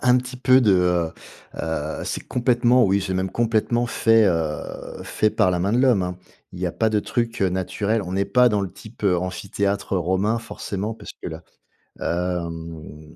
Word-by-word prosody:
un 125 0 +5
petit 125 0 -3
peu 130 +1 +5
de, 105 -4 +5
heu, 90 -2 +2 0.5
heu 80 -2 -3
c'est - - -4
complètement, 120 0 +3
oui, 100 +1 +2
c'est 95 -1 -2
même 95 +1 -1
complètement 115 +1 +1
fait, 115 -1 +4
heu, 80 -4 -3
fait 110 - +1
par 105 -3 +2
la 90 - 0
main 100 +4 0
de 120 - +3
l'Homme, 125 -7 +4
hein. 90 0 -3 0.4
Il 90 - -8
y 90 - 0
a 85 - -2
pas 110 -1 +1
de 105 - +2
trucs, 115 +2 -2
heu, 95 - +4
naturels. 100 +4 -1
On 90 - -6
n'est 100 +1 +1
pas 125 +4 +5
dans 105 -1 +1
le 95 -3 -3
type 110 +3 -12
amphithéâtre 100 +2 -1
romain, 95 +6 +1
forcément, 110 -2 -5
parce - - -10
que - - -3
là, 80 +1 -8 0.6
hem, 85 -3 -4
100 Hz, 190 wpm, -23 LUFS, 90-115 Hz, 0.6 s, un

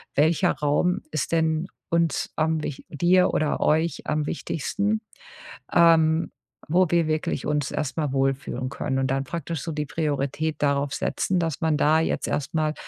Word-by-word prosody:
welcher 155 +3 +3
Raum 150 +5 +1
ist 155 +1 -2
denn 160 0 +1 0.2
uns 170 -1 0
am 160 0 +1
wich 135 - -6
dir 175 +4 +3
oder 155 -1 0
euch 160 0 +1
am 150 -1 0
wichtigsten, 200 +8 -2 0.7
ähm, 165 -1 +4 0.4
wo 180 +3 +4
wir 170 -2 +3
wirklich 155 -3 -1
uns 150 -2 0
erstmal 150 0 -2
wohlfühlen 135 -1 -1
können?“ 135 -1 -2
Und 135 0 0
dann 135 - 0
praktisch 165 +1 -4
so - - -4
die 150 0 -3
Priorität 150 +1 -2
darauf 140 0 +1
setzen, 185 - -1
dass 165 -1 -2
man 160 -2 +2
da 155 +2 +4
jetzt 160 - -1
erst 145 - -2
mal 155 -1 +1
155 Hz, 160 wpm, -25 LUFS, 145-165 Hz, 0.7 s, ähm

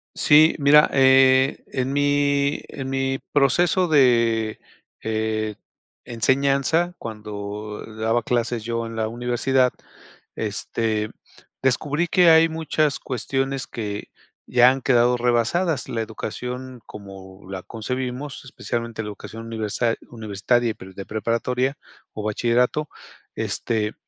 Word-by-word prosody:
Sí, 155 +2 +5
mira, 150 +1 +6
eh, 130 0 +5
en 130 +1 -2
mi 145 0 +1
en 135 -2 -6
mi 135 0 -1
proceso 175 +6 +3
de, 115 -7 +3 0.5
eh, 110 -1 -1 0.5
enseñanza 140 +8 +1
cuando 105 -1 -7
daba 110 +1 0
clases 120 -2 -1
yo 115 0 -2
en 115 0 -7
la 110 -1 0
universidad, 125 +2 +1 0.6
este, 110 -2 -2 0.5
descubrí 145 +6 0
que 180 +1 +5
hay 160 0 +6
muchas 155 -2 0
cuestiones 135 +2 -2
que 105 -3 -5 0.4
ya 125 0 +6
han 135 0 -2
quedado 125 -1 +3
rebasadas. 125 +7 0
La 115 -1 -2
educación, 125 +3 -6
como 95 -2 -12
la 95 -1 -5
concebimos, 125 +6 -5
especialmente 115 -3 -4
la 105 - -6
educación 115 +2 -9
universa 115 +1 -1 0.2
universitaria, 115 +2 0
y - - -4
pre 95 -1 -12
de 100 - -8
preparatoria 125 +5 -1 0.4
o 105 - -5
bachillerato, 120 +7 +1 0.5
este, 110 -2 -1
120 Hz, 115 wpm, -23 LUFS, 110-135 Hz, 0.6 s, mira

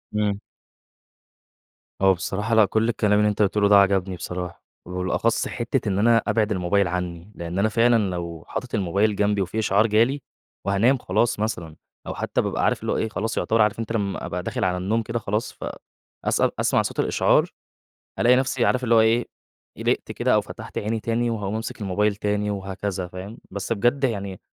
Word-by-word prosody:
إمم. 105 -1 0 1.6
هو 95 0 +6
بصراحة 105 +5 -2
لأ، 110 -1 +7
كل 110 +3 +1
الكلام 105 -3 +2
اللي 105 0 +4
أنت 105 - -1
قُلته 105 +1 +2
لي 100 - +4
ده 105 - +7
عجبني 95 -1 +3
بصراحة، 90 -1 -6 0.2
وبالأخص 90 +6 0
حتّة 120 -1 -2
إن 95 0 0
أنا 115 +2 +5
أبعد 110 -2 +1
الموبايل 95 0 +1
عني، 90 +1 -4
لأن 85 +2 -4
أنا 110 - +3
فعلًا 115 -2 +3
لو 85 -2 -5
حاطط 125 - -4
الموبايل 100 +2 +1
جنبي 105 0 +1
وفي 95 +4 -2
إشعار 105 +1 +3
جالي 120 +6 +2 0.4
وهانام 110 +7 +3
خلاص 110 +2 0
مثلًا 85 -8 -3 0.3
أو - - -4
حتى - - -1
بابقى - - -2
عارف - - +1
اللي - - -2
هو - - 0
إيه، 110 - -1
خلاص 110 +1 -3
يُعتبر 110 0 +2
عارف 105 +1 +2
أنت 115 -1 -4
لمّا 100 -4 -2
أبقى - - -4
داخل - - -3
على 90 -1 +1
النوم 105 +5 0
كده 115 +2 -3
خلاص، 105 +1 -2
ف - - -8 0.6
أسأل - - +1
أسمع - - +3
صوت - - -4
الإشعار، - - +3 0.7
ألاقي 125 +1 +5
نفْسِي 130 -2 +1
عارف 130 +2 +1
اللي 115 - +3
هو 115 - +7
إيه، 115 +2 +3 0.5
قلقت - - -1
كده - - +1
أو - - +4
فتحت - - -8
عيني 110 +2 -2
تاني 115 +2 0
وهاقوم 105 -3 -3
أمسك 110 0 -5
الموبايل 100 +1 0
تاني 105 0 -1
وهكذا 95 -1 -4
فاهم، 95 +5 -8
بس 100 +3 -3
بجد 120 +6 +1
يعني 100 -6 -2
105 Hz, 190 wpm, -24 LUFS, 95-115 Hz, 1.6 s, لأ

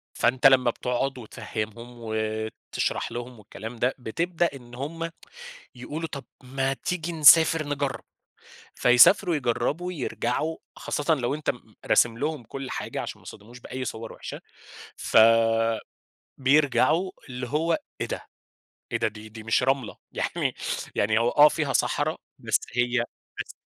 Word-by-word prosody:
فأنت 130 +2 +4
لمّا 130 -2 +5
بتقعُد 125 +3 -2
وتفهمهم، 110 0 -6
وتشرح 110 0 -3
لهم 120 -1 -7
والكلام 110 +3 -9
ده، 125 +3 0
بتبدأ 170 +8 0
إن 120 -3 -11
هُم 165 +6 -4 0.6
يقولوا: 150 +6 -5
"طَب 140 -2 -7 0.2
ما 135 +1 -1
تيجي 175 +3 -3
نسافر 160 0 +7
نجرّب." 140 -1 -2 0.7
فيسافروا 165 +9 +6
يجرّبوا، 150 +7 -1
يرجعوا 150 +1 -2 0.2
خاصةً 150 +2 0
لو 135 -1 -1
أنت 155 - -1
م - - -2
م 110 -2 -23
راسم 115 -1 +3
لهم 150 -3 -2
كل 135 +3 -7
حاجة - - -4
عشان - - -6
ما - - -21
يصتدموش 115 +4 -12
بأي 130 +2 -5
صور 115 -1 -6
وحشة، - - -8 0.6
ف - - +1 1.2
بيرجعوا 150 +5 +3 0.2
اللي 125 -1 -5
هو 160 +3 +1 0.2
إيه - - 0
ده؟! - - -6 0.7
إيه - - +1
ده؟! - - +1
دي 110 0 -9
دي 110 0 -10
مش 115 +2 +2
رملة 135 -3 0
يعني - - -2 0.4
يعني 110 +2 +2
هو 115 +1 +2
آه 150 +3 +7
فيها 150 -4 -1
صحرا، - - +1 0.2
بس - - +1 0.2
هي 125 0 +2 0.4
بس - - -9
130 Hz, 140 wpm, -26 LUFS, 120-150 Hz, 1.2 s, نسافر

